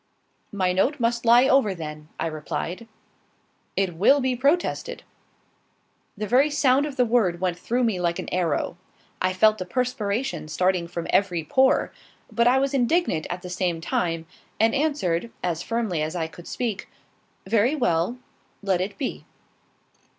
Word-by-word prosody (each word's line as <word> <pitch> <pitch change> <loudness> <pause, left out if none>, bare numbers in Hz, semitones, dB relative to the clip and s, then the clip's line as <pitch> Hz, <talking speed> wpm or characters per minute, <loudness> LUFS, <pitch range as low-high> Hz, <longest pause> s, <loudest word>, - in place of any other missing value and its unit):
"My 185 -3 0
note 260 +11 +1
must 235 0 0
lie 240 +3 +7
over, 260 -8 +3
then," 150 -2 -8
I - - -1
replied. 165 +6 -4 0.9
"It 190 -3 0
will 270 - +5
be 260 -1 0
protested." 285 +8 0 1.1
The 210 - -3
very 260 +8 +4
sound 285 -1 +3
of 285 - -7
the 250 - +3
word 220 -8 +2
went 180 -1 -1
through 245 +6 0
me 220 -6 +1
like 170 -1 0
an - - -5
arrow. 170 -2 -1 0.4
I 185 - +2
felt 215 +3 +3
the 185 - -3
perspiration 245 -2 -2
starting 180 +2 0
from 170 0 -5
every 180 -5 +2
pore; 265 - +2 0.4
but 235 +2 +2
I 250 +2 +5
was 275 +1 0
indignant 265 - +1
at 180 0 -5
the 180 - -7
same 180 -2 -1
time, 165 0 -1 0.3
and 225 +1 +3
answered, 250 - 0
as 170 -2 -1
firmly 220 -7 -1
as 155 +3 -2
I 165 -2 -1
could 170 +2 -11
speak 230 -6 -3 0.6
"Very 225 +7 +2
well; 180 - 0 0.5
let 190 -3 +1
it 200 +2 -4
be." 270 - -4
205 Hz, 160 wpm, -24 LUFS, 175-250 Hz, 1.1 s, lie